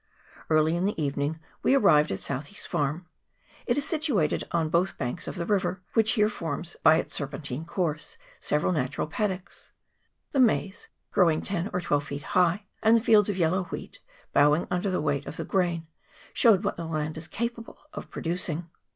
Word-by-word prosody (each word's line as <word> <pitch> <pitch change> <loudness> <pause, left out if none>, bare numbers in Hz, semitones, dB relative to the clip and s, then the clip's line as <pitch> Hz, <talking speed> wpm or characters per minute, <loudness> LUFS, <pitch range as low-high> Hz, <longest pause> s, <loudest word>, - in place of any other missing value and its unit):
Early 155 +1 +3
in 175 +2 0
the 205 -4 -1
evening 145 +2 -1 0.2
we 270 - +4
arrived 155 - +5
at 95 - -1
Southee's 140 - -4
farm; 150 +5 -1 0.6
it - - +2
is 290 - -1
situated 290 - +1
on 165 -2 0
both 180 +3 +1
banks 120 - -4
of - - -4
the 170 -2 -3
river, 190 -1 0
which 220 -1 +4
here 210 -3 +4
forms 170 -4 -4
by 160 - +7
its 165 - -2
serpentine 140 0 -4
course 165 -3 -2 0.2
several 150 +4 +1
natural 140 -4 -1
paddocks. 185 +3 -4 0.6
The 275 - 0
maize, 210 -5 +2 0.2
growing 165 -4 +3
ten 195 0 -1
or 180 - -1
twelve 145 -3 0
feet 145 -1 -6
high, 180 +3 +3 0.2
and 220 +1 +6
the - - 0
fields 210 -3 +5
of 200 - -1
yellow 180 +2 +1
wheat, - - -7 0.3
bowing 150 +3 +4
under 180 +3 0
the 185 - 0
weight 145 -2 -1
of - - -7
the - - -4
grain, 175 -4 0 0.5
showed 215 -4 +5
what 205 - -1
the 170 - -4
land 155 -1 -2
is 160 0 -6
capable 235 +2 -4 0.2
of - - -7
producing. 170 -1 -3
170 Hz, 180 wpm, -27 LUFS, 155-200 Hz, 0.6 s, by